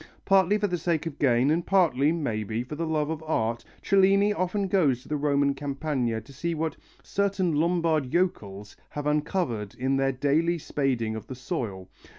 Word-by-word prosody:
Partly 195 +1 +4
for 210 - 0
the 180 -3 -1
sake 165 -1 -1
of 155 -3 -6
gain, 130 0 +3
and 170 +2 +1
partly, 160 -7 +3
maybe, 115 -8 -2
for 125 - -9
the 165 +2 -3
love 155 -1 0
of 160 -1 -4
art, 115 -7 -1 0.2
Cellini 195 +1 +4
often 195 +1 -1
goes 150 -10 +2
to - - -17
the 150 - 0
Roman 140 -1 +2
Campagna 135 -4 -2
to 140 +6 -15
see 165 +5 -2
what 160 -1 -2 0.3
"certain 195 -4 0
Lombard 160 -3 +1
yokels" 105 - -2
have 145 0 -5
uncovered 150 - -1
in 135 +2 0
their 135 0 +2
daily 150 +6 +1
spading 130 -8 -1
of 110 - -7
the 130 - -6
soil. 120 - -4
150 Hz, 175 wpm, -26 LUFS, 130-170 Hz, 0.3 s, Partly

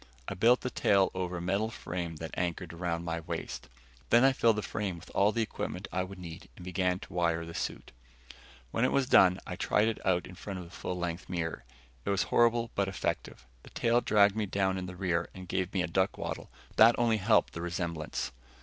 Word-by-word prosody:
I - - -2
built 120 +6 +4
the 125 - -3
tail 100 -3 +3
over 90 -1 -3
a - - -4
metal 100 +5 0
frame 85 -6 -5
that 80 +1 -7
anchored 90 0 -2
around 85 0 -2
my 85 0 -2
waist. 80 - -5 0.4
Then 120 +2 +6
I 135 0 +6
filled 115 -3 +4
the 105 - -2
frame 100 -4 -3
with 85 +1 -12
all 100 +2 +4
the 115 +1 +1
equipment - - -4
I 95 - 0
would 95 +1 -6
need 85 -1 -9
and 90 - -11
began 90 0 0
to - - -11
wire 85 -2 +1
the 85 - -8
suit. - - -4 0.8
When 115 - 0
it 125 - +3
was 140 - +2
done, 95 -6 +6
I 90 - -5
tried 105 +3 +2
it 115 - -2
on 90 -2 +2
in 90 - -10
front 95 +1 -6
of 90 - -7
a - - -13
full 90 - -4
length 85 0 -4
mirror. 85 -6 -3 0.4
It - - -3
was 100 -1 +2
horrible 120 0 +3
but 100 -1 +1
effective. 95 -8 -3 0.2
The - - -14
tail 120 +1 +2
dragged 105 -3 +4
me 110 -2 -1
down 95 -1 0
in 90 - -5
the 90 - -7
rear 90 -2 0
and 95 -1 -9
gave 95 0 -1
me 95 -2 0
a - - -1
duck 95 +3 +1
waddle, - - -5 0.2
but - - -24
that 115 +2 +8
only 115 -2 +3
helped 105 +2 +3
the 85 - -5
resemblance. 85 -5 -3
95 Hz, 230 wpm, -30 LUFS, 85-105 Hz, 0.8 s, that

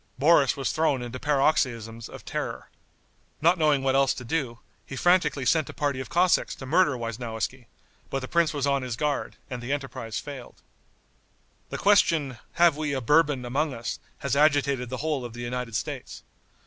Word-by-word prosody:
Boris 145 -1 +4
was 135 - -1
thrown 145 -5 +1
into 120 +1 -6
paroxysms 125 -6 0
of - - -11
terror. - - -4 0.7
Not 170 +3 +3
knowing 150 -3 +3
what 135 -1 +2
else 135 -1 +3
to 125 - -7
do, 125 -2 -2 0.3
he - - -8
franticly 155 -4 +2
sent 160 0 +2
a - - -9
party 145 -4 -1
of 130 - -6
Cossacks 180 +1 +2
to 135 - -9
murder 145 -1 +3
Weisnowiski; 115 +1 -4 0.4
but 135 - -2
the 130 - -5
prince 170 +1 +2
was 145 -2 -1
on 140 -1 +1
his 125 -3 -4
guard, 150 +3 -2
and 125 -3 -6
the 120 +3 -5
enterprise 130 -6 -4
failed. 135 -2 -8 1.1
The - - -4
question, 165 - +3
"Have 170 -3 +5
we 150 -1 -2
a 135 - 0
Bourbon 145 0 +3
among 140 +3 -1
us?" 115 +1 -4 0.2
has 140 -1 -2
agitated 140 -4 +2
the 130 - -4
whole 150 -5 -1
of 120 -2 -7
the 120 - -7
United 120 -1 -4
States. 100 - -5
135 Hz, 180 wpm, -26 LUFS, 125-150 Hz, 1.1 s, Have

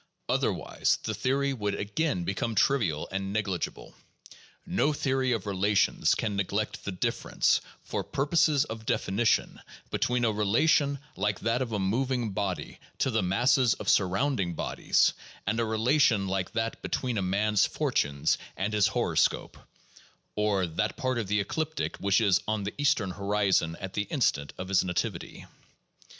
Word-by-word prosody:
Otherwise, - - 0
the - - -2
theory 140 +1 0
would 105 -5 -2
again 100 - -1
become 100 +5 -2
trivial 105 - +1
and 95 0 -3
negligible. 100 -4 -3 0.7
No 150 - +1
theory 130 -2 0
of 115 -5 -1
relations 100 +1 +2
can 105 -3 -2
neglect 100 +2 -2
the 100 - -2
difference, 90 - +1 0.2
for - - -3
purposes 150 0 +2
of 110 -3 -8
definition, 110 +4 +1 0.3
between 125 -1 +1
a 110 - +2
relation 140 +8 +2 0.2
like 105 0 -1
that 115 +3 0
of 125 -3 -2
a 105 - -1
moving 120 +4 0
body 95 -2 -3 0.2
to 130 - +1
the 110 -2 +1
masses 120 +7 +3
of - - -8
surrounding 95 -1 +1
bodies, - - +1 0.3
and 110 +3 0
a 115 - +1
relation 110 -1 +2
like 95 -1 -2
that 115 0 -2
between 125 -5 -2
a - - 0
man's 100 +2 +2
fortunes 70 -1 0 0.2
and 105 +3 -2
his 105 -2 +4
horoscope - - 0 0.8
(or, 105 -3 +1
"that 90 +6 -2
part 130 -5 -1
of 110 - -3
the 105 +1 +1
ecliptic 155 +10 -2
which 100 +1 +2
is 100 -5 +3
on 110 -1 -1
the 100 - -4
eastern 110 -9 +2
horizon 100 -4 +1
at 95 -1 -6
the 105 -1 -2
in - - -2
stant 70 0 +1
of 95 - -5
his 95 -1 +3
nativity"). 90 -2 -3
105 Hz, 155 wpm, -28 LUFS, 95-125 Hz, 0.8 s, his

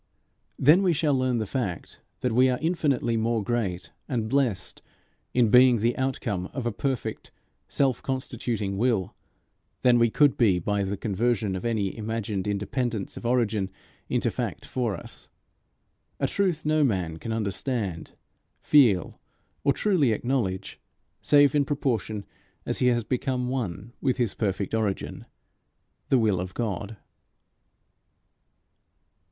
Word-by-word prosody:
Then 155 +8 +6
we 185 -3 +3
shall 150 -1 +1
learn 130 -2 +1
the 110 - -1
fact 100 - -4 0.2
that 125 - 0
we 130 +3 +4
are 125 - +1
infinitely 145 -8 0
more 115 -1 0
great 95 -6 -2 0.2
and 115 -5 -1
blessed 120 -7 0 0.5
in 120 -3 +3
being 125 -1 +7
the 115 +3 +1
outcome 115 -8 -2
of 130 -4 -4
a 120 - +1
perfect 130 +3 -3 0.4
self 135 -3 +1
constituting 120 -7 -3
will, 115 -6 +1 0.7
than 125 -1 +5
we 115 0 +4
could 145 +4 +3
be 105 -7 +4
by 100 +3 0
the 100 +1 -3
conversion 105 -1 0
of 95 - -5
any 105 -5 -1
imagined 105 -3 -3
independence 105 +1 -2
of 120 - -5
origin 110 -5 +1 0.4
into - - +1
fact - - -4
for 120 -6 -1
us - - -9 0.9
a - - +1
truth 180 -6 0
no 155 0 +3
man 90 - 0
can 115 - -6
understand, 105 -3 -2 0.5
feel, 115 - +3 0.4
or 140 - +4
truly 155 - +2
acknowledge, 105 -6 -2 0.4
save 145 -2 +5
in 145 -1 +3
proportion 120 -7 -2 0.4
as - - -2
he 125 - +3
has 120 -2 +2
become 125 +1 -1
one 120 -3 -4
with 130 -2 +1
his 120 -5 0
perfect 100 -2 -2
origin, 110 -3 -2 0.8
the 135 - +5
will 105 -6 +2
of 90 0 -5
God. 105 -2 -3
115 Hz, 135 wpm, -26 LUFS, 100-130 Hz, 0.9 s, being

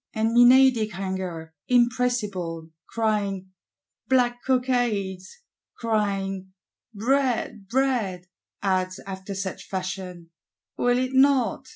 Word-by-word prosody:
And 220 +1 +1
Menadic 245 -3 +6
Hunger, 185 -4 -5
impressible, 230 -10 0 0.2
crying 200 -4 -1 0.6
'Black 245 -2 +2
Cockades,' 245 - -1 0.3
crying 195 -4 -2 0.4
'Bread, 235 -2 0
Bread,' 230 -7 0 0.4
adds, 185 -1 0
after 195 0 -6
such 190 -1 -5
fashion: 185 -3 -5 0.4
'Will 245 0 +2
it 255 +1 -1
not? 265 -3 +3
210 Hz, 85 wpm, -25 LUFS, 190-245 Hz, 0.6 s, Menadic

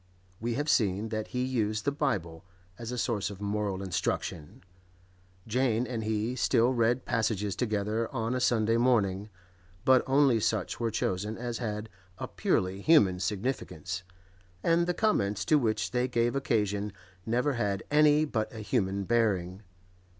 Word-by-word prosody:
We 115 +1 -2
have 145 +2 -2
seen 105 -5 +2
that 110 -1 -3
he 125 0 -2
used 110 -4 -1
the 140 - +2
Bible 100 - -2 0.4
as 115 0 -5
a 125 - -4
source 105 -4 -1
of 100 -2 -9
moral 100 -1 -2
instruction; 85 -3 -3 0.8
Jane 120 0 +1
and 115 -2 -4
he 110 +3 -1
still 120 0 +3
read 120 +1 +1
passages 105 -3 0
together 110 -1 -1
on 115 -2 -2
a 130 - 0
Sunday 115 -2 +2
morning, 105 -5 +2 0.6
but 130 -1 +6
only 135 -3 +4
such 105 -2 -1
were 115 -1 0
chosen 105 +1 -2
as 120 -1 -4
had 105 -2 -3 0.3
a - - -5
purely 95 +1 0
human 100 - +5
significance, 90 - -3 0.6
and 170 +1 +3
the 180 - 0
comments 105 - +1
to 155 - +4
which 110 -4 0
they 125 0 +1
gave 120 0 0
occasion 105 -6 0 0.3
never 125 +7 +1
had 100 -5 -1
any 150 0 +5
but 115 -6 -2
a 115 - -10
human 100 -3 0
bearing. 95 -4 0
110 Hz, 150 wpm, -29 LUFS, 100-125 Hz, 0.8 s, but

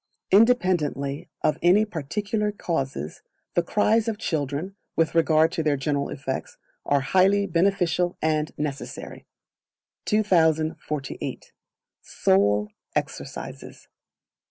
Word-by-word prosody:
Independently 180 - +2
of 155 - +1
any 185 +5 +5
particular 210 - -2
causes, 135 - -3 0.3
the 175 - +3
cries 215 +5 +2
of 220 -2 -1
children, 160 - -2 0.2
with 160 -1 +1
regard 160 -1 +4
to 165 - -1
their 150 -2 +1
general 140 +1 -1
effects, 130 -1 -5 0.3
are 145 -1 +3
highly 190 +7 +3
beneficial 180 -1 +1
and 155 -1 0
necessary. 145 -2 -5 0.8
2048. 160 -8 0 0.5
Sole 105 +2 +2 0.3
Exercises. - - -5
160 Hz, 95 wpm, -25 LUFS, 145-195 Hz, 0.8 s, any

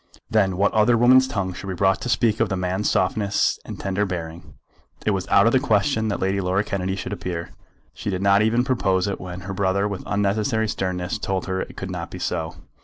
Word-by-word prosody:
Then 95 -5 +2
what 100 +1 +2
other 110 +2 +4
woman's 130 +2 +6
tongue 100 -7 -2
should 95 - -8
be 95 - -3
brought 95 +3 +2
to 125 - -4
speak 115 -3 +2
of 115 -3 +2
the 95 - -1
man's 90 +3 -1
softness 100 +2 +1
and - - -8
tender 100 +1 -1
bearing! 85 -3 -6 0.5
It 105 - +3
was 95 -2 -2
out 100 - +5
of 115 - +4
the 130 - +4
question 110 -1 +1
that 100 - -2
Lady 95 +1 0
Laura 95 +2 +1
Kennedy 95 -2 -2
should 100 0 -5
appear. 85 -3 -5 0.4
She - - -5
did 95 -1 -2
not 100 0 +5
even 115 +3 +2
propose 95 -8 +1
it 100 - -3
when 90 0 -7
her 95 +2 -6
brother 100 +1 +1
with 100 -2 -4
unnecessary 105 +2 0
sternness 95 +1 -2
told 95 -3 -2
her 95 0 -2
it - - -8
could 95 -1 -5
not 85 -2 -5
be - - -8
so. 80 -2 -3
100 Hz, 225 wpm, -23 LUFS, 95-105 Hz, 0.5 s, woman's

